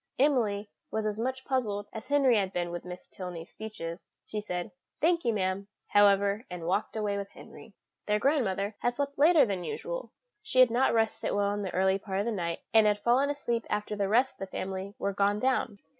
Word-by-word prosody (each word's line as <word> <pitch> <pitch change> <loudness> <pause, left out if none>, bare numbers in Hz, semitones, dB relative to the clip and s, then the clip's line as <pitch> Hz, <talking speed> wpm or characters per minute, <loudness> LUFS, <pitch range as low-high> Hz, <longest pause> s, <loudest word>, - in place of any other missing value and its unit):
Emily 230 -7 +2 0.2
was 220 0 -2
as 215 0 -2
much 260 +2 -2
puzzled 210 -7 -1
as 220 +2 -7
Henry 275 -3 +4
had 195 -3 +1
been 175 -2 -2
with 175 0 -6
Miss 180 0 -8
Tilney's 180 -3 -8
speeches. 170 -6 -7 0.2
She 210 - -4
said, 180 0 -4 0.3
"Thank 335 +2 +2
you, 235 - +2
ma'am," 195 -1 -1 0.2
however, 200 +1 +4
and 180 -2 -6
walked 190 +6 -1
away 210 -2 -1
with 200 0 -6
Henry. 220 -3 -14 0.3
Their 210 0 +3
grandmother 210 -6 +1
had 245 0 0
slept 280 0 -3
later 310 -1 +7
than 195 -5 -3
usual; - - -5 0.3
she 425 -12 0
had 255 -2 +7
not 250 +3 +3
rested 225 -1 +1
well 200 0 +1
in 205 - -3
the 195 - -3
early 190 +1 +3
part 190 -1 -4
of 205 - 0
the 235 - 0
night, 170 -5 -3
and 220 -1 +6
had 210 0 +3
fallen 245 +6 +2
asleep 240 -5 -1
after 210 0 -2
the 200 -1 -1
rest 250 +5 +4
of - - -36
the 195 - -4
family 190 +1 -5
were 200 - -1
gone 200 +1 +2
down. 255 -4 0
210 Hz, 210 wpm, -29 LUFS, 195-245 Hz, 0.3 s, later